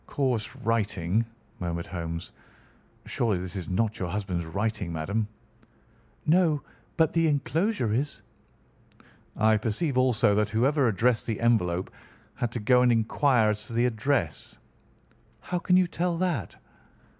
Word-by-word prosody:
"Coarse 125 -4 -1
writing," 110 -5 0 0.4
murmured 85 -1 -3
Holmes. 85 -1 -5 0.7
"Surely 110 -5 0
this 90 +1 -5
is 90 -4 -4
not 105 +4 0
your 90 - -2
husband's 90 -4 -3
writing, 100 +1 -2
madam." 100 +7 -1 1.0
"No, 160 -3 +3 0.3
but 160 -2 +3
the 165 -1 +3
enclosure 145 - 0
is." 120 -4 -2 1.1
"I 110 0 +4
perceive 125 +6 -1
also 120 -4 +3
that 105 0 +1
whoever 130 +5 +2
addressed 115 +3 +1
the 110 -3 -2
envelope 95 -7 +1 0.4
had 120 - -2
to 120 - -2
go 125 +4 +4
and 125 -1 +4
inquire 115 0 +3
as 105 0 -5
to - - -8
the 120 +1 +2
address." 115 - -1 0.8
"How 180 - -3
can 180 +1 +3
you 185 - +5
tell 175 0 -1
that?" 170 - -1
115 Hz, 135 wpm, -27 LUFS, 100-135 Hz, 1.1 s, you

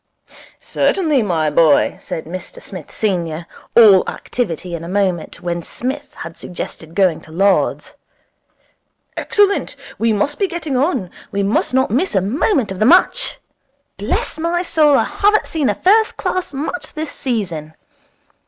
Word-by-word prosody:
'Certainly, 310 -9 +1
my 170 -7 0
boy,' 155 -1 +4
said 160 - -6
Mr 180 +3 -7
Smith 180 -6 -10
senior, 170 -6 -2 0.3
all 205 -5 +8
activity 180 -7 -4
in 165 -1 -4
a - - -7
moment, 185 -3 -1
when 175 -1 -2
Psmith 270 - -5
had 165 0 -8
suggested 165 -2 -7
going 185 -5 +2
to 155 - -15
Lord's. 195 +4 +1 1.2
'Excellent. 405 -1 +1 0.2
We 230 0 +2
must 220 +8 0
be 395 - +2
getting 330 -6 -4
on. 255 - 0 0.2
We 200 0 -1
must 205 +5 0
not 260 -5 +2
miss 275 - +1
a - - +5
moment 245 - +1
of 190 - -6
the 215 - +3
match. 370 - +3 0.6
Bless - - -2
my 340 +2 0
soul: 300 -5 +4
I - - +3
haven't 420 +1 +2
seen 300 -7 -1
a 205 - 0
first 435 - +3
class 370 -4 -2
match 295 +5 -5
this 310 0 -4
season. 170 - -3
215 Hz, 150 wpm, -18 LUFS, -, 1.2 s, all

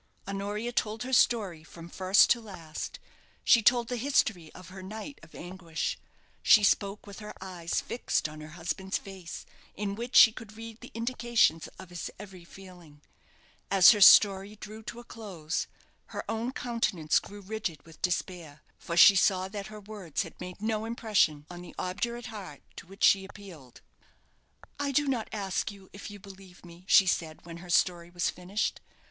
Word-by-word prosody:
Honoria 205 +4 -3
told 220 -1 -2
her 260 +1 -5
story 200 -10 +2
from 165 +1 -12
first 185 +3 +4
to 235 - +3
last; 170 -8 -7 0.5
she 230 - +6
told 240 +2 +4
the 245 - -3
history 220 - 0
of 185 -1 -12
her 190 0 -10
night 220 +9 -8
of 165 - -16
anguish. 175 -2 -4 0.5
She 210 - +6
spoke 200 0 +1
with 200 0 -10
her 210 -1 -9
eyes 180 -3 -3
fixed 235 - -1
on 155 0 -10
her 155 +2 -11
husband's 190 +3 -2
face, 190 -3 -9 0.3
in 200 0 -3
which 235 +4 -6
she 225 - +10
could 220 -1 -11
read 225 0 -9
the 245 - -10
indications 230 -8 +1
of 190 -2 -12
his 175 - -5
every 190 -3 -11
feeling. 175 -5 -15 0.7
As 195 -2 +8
her 210 -3 +1
story 195 +1 +7
drew 215 +1 -10
to 235 - -7
a - - -10
close, 185 -10 -5 0.4
her - - -6
own 225 +3 -2
countenance 215 - 0
grew 205 0 -11
rigid 195 -7 -5
with 165 -1 -16
despair, 175 -4 -3 0.2
for 170 - -5
she 195 +3 +9
saw 190 -1 +3
that 200 -1 -6
her 215 0 -10
words 200 -6 -4
had - - -13
made 180 +3 -8
no 220 0 -1
impression 210 - +1
on 175 0 -9
the 175 - -12
obdurate 235 +6 -3
heart 205 -3 -9
to - - -10
which 195 +2 -9
she 195 -1 +6
appealed. 185 - -13 1.0
"I 285 -1 -1
do 290 +2 +2
not 250 -5 -1
ask 200 0 -2
you 195 -2 -16
if 200 - -8
you 205 - -9
believe 190 -2 -14
me," 175 +1 -14
she 195 - +7
said, 165 -3 -2
when 170 -1 -9
her 175 +1 -12
story 175 -1 +2
was 175 0 -1
finished. 185 +4 -3
195 Hz, 175 wpm, -29 LUFS, 175-220 Hz, 1.0 s, she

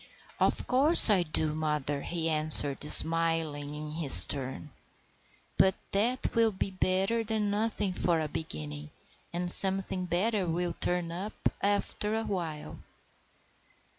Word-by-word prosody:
"Of - - -4
course 275 -1 +5
I 195 -3 -1
do, 155 -2 -5
mother," 150 -2 -7
he 165 +1 -8
answered, 155 -3 +4
smiling 160 -2 +1
in 150 0 -12
his 155 -3 +8
turn. 135 +1 -9 0.9
"But 190 0 -1 0.2
that 235 +6 -5
will 230 -2 -2
be 195 0 -9
better 190 +4 -5
than 215 -2 -6
nothing 210 -2 -6
for 170 -2 -5
a 155 - -7
beginning, 75 - -11 0.4
and 175 +1 +6
something 190 -1 +4
better 190 +3 -5
will 175 +1 -7
turn 175 -1 -6
up 190 +5 -10 0.3
after 205 +1 -6
a 225 - -7
while." 170 -8 -10
175 Hz, 130 wpm, -24 LUFS, 155-200 Hz, 0.9 s, his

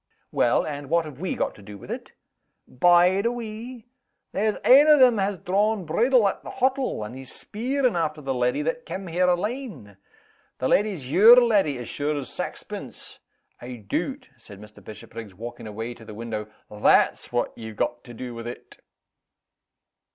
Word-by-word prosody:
"Well 120 - +2
and 145 -2 -6
what 170 0 +2
have 145 -3 -10
we 185 +1 -2
got - - -1
to - - -16
do 105 0 -10
with - - -10
it?" - - -7 0.5
"Bide 180 - +4
a - - +1
wee! 235 0 -7 0.5
There's 215 +1 0
ane 280 +4 +8
o' 300 -1 +7
them 250 -5 +5
has 195 0 0
drawn 200 +3 0
bridle 230 +7 +3
at 195 - -3
the - - -8
hottle, 260 - 0
and 105 +4 -8
he's 130 -1 -8
speerin' 250 +1 -1
after 155 -2 -1
the 135 -2 -3
leddy 125 +3 0
that 165 +11 -3
cam' 185 +3 -5
here 180 +1 +1
alane. 180 - -3 0.6
The 130 - -1
leddy's 185 -11 0
your 225 +9 +9
leddy, 205 - +2
as 120 - -7
sure 150 +1 -2
as 135 -3 -5
saxpence. - - -7 0.4
I 125 +1 -7
doot," 180 - -4
said 105 -4 -13
Mr. 105 +1 -14
Bishopriggs, 110 -1 -10
walking 120 +2 -8
away 110 +3 -5
to 115 - -15
the 105 -1 -10
window, 110 -1 -5 0.2
"that's 105 0 +2
what 120 0 -1
ye've 110 -1 -8
got 120 - -2
to 120 -2 -11
do 125 +1 -6
with 115 0 -7
it." 120 - -10
160 Hz, 175 wpm, -25 LUFS, -, 0.6 s, your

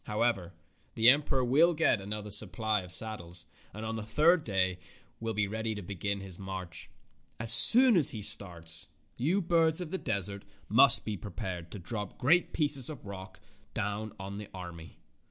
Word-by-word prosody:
How 105 +2 -2
ever, 100 -8 -2 0.4
the 115 +2 +6
emperor 140 -2 -1
will 160 +7 +2
get 150 -9 +1
another 105 +1 -7
supply 105 +1 0
of 90 -1 -12
saddles, 85 -3 -3 0.3
and 110 +2 -9
on 110 0 -5
the 110 - -6
third 155 +10 +2
day 95 -3 -2 0.4
will 115 -1 -5
be 105 0 0
ready 110 +1 -5
to 105 - -8
begin 100 +2 -5
his 95 -2 -10
march. 95 -2 -9 0.5
As 110 0 +7
soon 250 -1 +9
as 160 -7 +6
he 105 -3 -7
starts, 85 -5 -4 0.3
you 175 +10 -1
birds 165 -1 +1
of 175 -3 -7
the 190 - -4
desert 100 -3 -3 0.3
must 115 +3 +7
be 105 -2 -5
prepared 90 -4 -8
to - - -7
drop 105 +1 -8
great 170 +8 +1
pieces 145 -4 -2
of 145 -8 -10
rock 95 -1 -11 0.4
down 105 +1 -4
on 100 +1 -8
the 105 - -10
army." 85 -3 -11
105 Hz, 175 wpm, -29 LUFS, 95-130 Hz, 0.5 s, soon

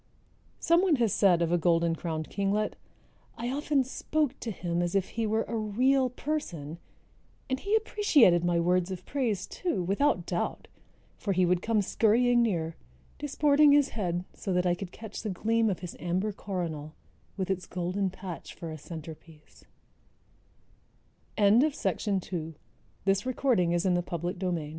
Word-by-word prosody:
Someone 340 0 +4
has 230 -6 +1
said 180 -4 +4
of 165 - -1
a 175 - +3
Golden 170 0 +2
crowned 160 -2 -4
Kinglet: 200 +1 0 0.6
"I 240 +2 -3
often 285 0 +1
spoke 295 +2 -1
to 235 - -5
him 175 -4 -2
as 175 +1 -1
if 195 -1 +1
he 225 -1 -2
were 220 +1 +1
a 235 - -5
real 250 +5 +2
person; 175 - -4 0.7
and 260 0 -1
he 405 +6 0
appreciated 310 - +4
my 175 -1 +2
words 180 +1 +2
of 185 -1 -6
praise, 230 -9 -1
too, 285 - -2
without 195 0 +1
doubt, 175 -2 -3 0.5
for 200 - -1
he 185 0 +3
would 180 0 +2
come 220 -2 +1
scurrying 240 +4 +3
near, 165 -8 0 0.4
disporting 290 0 +4
his 285 -1 +4
head 180 -4 -2
so 195 - -5
that 180 0 +1
I 175 - +3
could 180 0 -6
catch 220 -2 -8
the 215 - -3
gleam 225 +4 +1
of 190 - -3
his 180 - -7
amber 185 +5 -1
coronal, 165 -7 -5 0.4
with 190 -1 -1
its 185 -2 -3
golden 185 +2 -1
patch 185 -2 -8
for 165 -2 -7
a 155 - -7
center 160 +1 -8
195 Hz, 140 wpm, -29 LUFS, 175-245 Hz, 0.7 s, Someone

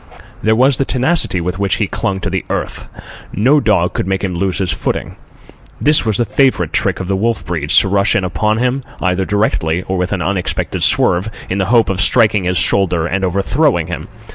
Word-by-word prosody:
There 110 0 +2
was 130 +3 +3
the - - +1
tenacity 130 - 0
with 90 +2 -4
which 100 -2 +1
he - - 0
clung 95 -1 -3
to - - -2
the - - -2
earth. - - -4 0.5
No 130 +10 +3
dog 105 -8 +1
could - - -3
make 95 0 -2
him 95 -2 -2
lose 90 +1 -1
his 95 -3 0
footing. - - -3 0.6
This 150 -4 +3
was 105 -3 +1
the 120 - +1
favourite 130 +5 +1
trick - - 0
of 95 - -5
the 100 - 0
wolf 115 +4 -1
breeds—to 80 +2 +2
rush 100 +1 +2
in 100 - +1
upon 105 +4 0
him, 125 +3 0 0.2
either 95 +1 0
directly 90 -5 0
or 95 -1 -3
with 90 +2 -2
an 95 -4 -2
unexpected 95 -3 -2
swerve, 90 +5 +2 0.2
in 95 - -1
the 95 - +1
hope 115 +1 +3
of 95 -1 -1
striking 105 0 +3
his 90 0 0
shoulder 90 -4 +2
and 95 +3 -2
overthrowing 100 - +1
him. 85 0 -6
100 Hz, 205 wpm, -15 LUFS, 90-110 Hz, 0.6 s, was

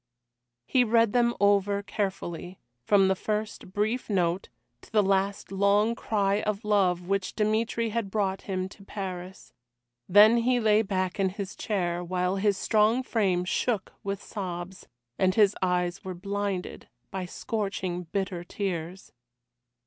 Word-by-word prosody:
He 255 - +3
read 230 -2 +3
them 235 -1 +3
over 200 0 +3
carefully, 190 -3 -4 0.3
from 195 +7 +4
the 190 - +3
first 210 -1 -4
brief 215 +6 -1
note 180 -2 0 0.3
to - - -18
the 215 -2 +4
last 195 +1 0
long 200 +3 +3
cry 205 -3 0
of 210 +1 -2
love 185 -4 +2
which 195 -1 -1
Dmitry 220 +2 0
had 225 -2 -2
brought 195 -2 -1
him 185 -1 -3
to 200 - -15
Paris. 190 -2 -7 0.6
Then 210 +5 +7
he 245 +1 +2
lay 215 -1 +4
back 185 -2 -2
in 195 -1 +3
his 195 +1 -6
chair, 175 -4 -1
while 180 +2 -1
his 200 0 +2
strong 220 +5 +2
frame 190 -7 +1
shook 210 +1 -1
with 200 -1 -4
sobs, 185 -1 -6 0.3
and 185 0 +3
his 210 -2 +4
eyes 180 0 0
were 185 -1 -5
blinded 200 0 -4 0.2
by 190 -2 -4
scorching, 190 -4 -3
bitter 185 0 -3
tears. 180 -1 -4
195 Hz, 140 wpm, -27 LUFS, 185-210 Hz, 0.6 s, Then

